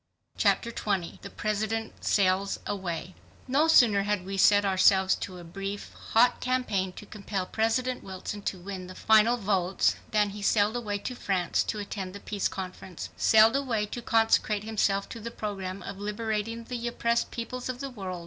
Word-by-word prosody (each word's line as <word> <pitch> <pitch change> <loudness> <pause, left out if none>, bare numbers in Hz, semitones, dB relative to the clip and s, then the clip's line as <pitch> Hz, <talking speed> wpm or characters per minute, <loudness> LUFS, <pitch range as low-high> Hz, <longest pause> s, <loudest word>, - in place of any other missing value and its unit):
Chapter 235 - +2
20 195 -6 -2
The - - -8
President 220 +1 -2
Sails 195 0 +2
Away 185 -2 -4 0.3
No 285 +5 +3
sooner 230 -10 +6
had 205 -2 -1
we 195 +1 -4
set 205 +1 +5
ourselves 190 0 +4
to 185 -2 -6
a 175 - -10
brief, 195 +4 -6 0.2
hot 240 +2 +5
campaign 250 -7 0
to 210 - -10
compel 200 -2 -4
President 235 +5 0
Wilson 190 +2 -6
to 195 - -3
win 185 0 -7
the 185 - -10
final 220 +2 +4
votes 195 -3 +1
than 210 -1 +2
he 205 +1 -8
sailed 205 +2 +2
away 210 -4 -2
to 230 +5 -5
France 190 -7 0
to 215 - -3
attend 200 -2 -5
the - - -7
Peace 200 -1 -2
Conference, 185 -2 -7
sailed 220 +2 +5
away 245 -6 0
to 240 +3 -6
consecrate 225 -2 +2
himself 205 -2 0
to 230 - -7
the 230 +1 -5
program 195 -4 -5
of 200 0 -7
liberating 220 +2 -3
the 240 0 -4
oppressed 235 0 0
peoples 250 +2 -5
of 250 -1 -4
the 275 0 -5
whole 215 -6 -10
world. 185 -1 -4
205 Hz, 175 wpm, -28 LUFS, 195-230 Hz, 0.3 s, sooner